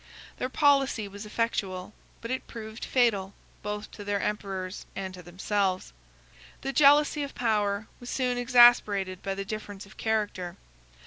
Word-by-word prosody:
Their 255 - -2
policy 270 -6 +3
was 200 +2 -9
effectual, 210 -4 -2 0.3
but 230 - -5
it 260 - -3
proved 220 -1 -7
fatal 205 -6 +2 0.3
both 210 0 -5
to 205 - -9
their 205 0 -1
emperors 195 -3 -3
and 190 -1 -4
to 180 - -9
themselves. 185 - -1 0.7
The 270 - -3
jealousy 295 +1 +5
of 280 -1 -5
power 210 -3 +1
was 245 - -9
soon 250 -2 0
exasperated 240 -6 +5
by 195 -1 -3
the 195 0 -4
difference 205 -1 -6
of 200 - -17
character. 205 -5 -1
210 Hz, 145 wpm, -28 LUFS, 195-240 Hz, 0.7 s, jealousy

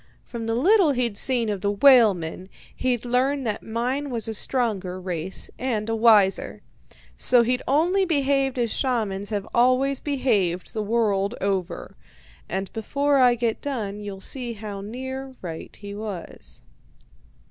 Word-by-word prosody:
From 230 -2 -6
the 225 - 0
little 360 - +4
he'd 240 -4 -1
seen 240 +1 +2
of 200 -3 -3
the 200 - 0
whalemen, 200 -7 +4 0.3
he'd 250 -2 -1
learned 260 +3 0
that 215 -2 -2
mine 250 +6 -2
was 230 -4 -3
a 225 - -3
stronger 205 -6 -2
race, 180 0 -2
and 230 -4 -2
a 225 - 0
wiser; 215 -4 +3 0.5
so 240 - +6
he'd 250 +2 0
only 345 +8 +2
behaved 275 -5 +1
as 235 -3 0
shamans 210 -7 -1
have 205 -2 -3
always 255 +3 +3
behaved 215 - 0
the 215 - -2
world 210 -1 0
over. 195 -3 -3 0.5
And 190 +2 -4
before 280 +5 0
I 250 -2 +5
get 230 -2 -2
done, 215 -8 -4
you'll 200 -2 -7
see 245 +2 -3
how 205 -2 -7
near 260 +5 -6
right 165 -2 -7
he 205 -1 -9
was. 185 - -7
230 Hz, 145 wpm, -24 LUFS, 200-260 Hz, 0.5 s, so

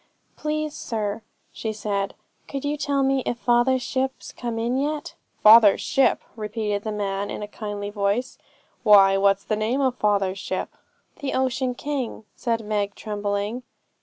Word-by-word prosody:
'Please, 305 0 -2
sir,' 215 -1 -3 0.3
she 220 - -4
said, 200 -2 -2 0.3
'could 275 0 -5
you 290 +1 0
tell 280 -1 0
me 270 0 +2
if 240 - -1
father's 245 +2 +2
ship's 265 0 -2
come 235 -2 -4
in 235 +2 0
yet?' 295 +2 -2 0.3
'Father's 215 -2 +8
ship!' 270 0 +2
repeated 210 -2 -2
the 215 - -4
man 200 -1 -2
in - - -5
a - - -5
kindly 205 -1 -5
voice. 205 +4 -1 0.4
'Why, 200 -3 +7
what's 195 0 +3
the 215 - -1
name 220 +5 0
of 260 -2 +2
father's 200 -3 +1
ship?' - - -4 0.4
'The 280 -2 -3
Ocean 260 -1 0
King,' 265 -6 -4
said 230 -3 -2
Meg, 205 -1 -1
trembling. 205 +2 -3
220 Hz, 155 wpm, -24 LUFS, 205-260 Hz, 0.4 s, Father's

